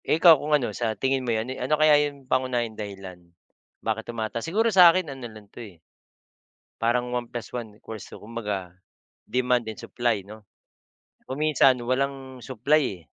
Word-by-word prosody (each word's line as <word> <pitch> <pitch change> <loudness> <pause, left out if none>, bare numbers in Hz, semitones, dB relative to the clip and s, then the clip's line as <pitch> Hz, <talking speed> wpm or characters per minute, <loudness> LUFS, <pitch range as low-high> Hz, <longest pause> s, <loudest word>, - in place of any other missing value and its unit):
Eh, - - +2
ikaw, 165 0 +9
kung 150 - -4
ano, 130 - -3
sa 110 -2 -2
tingin 135 0 0
mo 125 - -4
'yon 115 +3 -1
ano 150 +5 +1
kaya 155 0 +5 0.2
yung 140 -2 -16
pangunahing 125 -3 0
dahilan 95 -4 -8 0.6
bakit 110 0 -2
tumataas? 115 0 -3
Siguro 225 +5 +2
sa 180 -2 +9
akin 165 -4 0
ano 130 -3 -8
lang 110 -1 -13
'to, - - -9
eh 100 -8 -12 1.0
parang 120 +1 +1
1 120 -1 -3
plus 120 -1 -7
1 110 -4 -6
equals 110 -2 -9
2. - - -10
Kumbaga, 105 -5 -5 0.6
demand 125 -2 +1
and 110 - -7
supply 115 -5 -2
'no? 110 +2 -11 0.8
Kung 130 - -6
minsan 150 -4 +4
walang 130 0 -2
supply, 140 +5 +1
eh. 95 -10 -4
120 Hz, 175 wpm, -25 LUFS, 110-135 Hz, 1.0 s, ikaw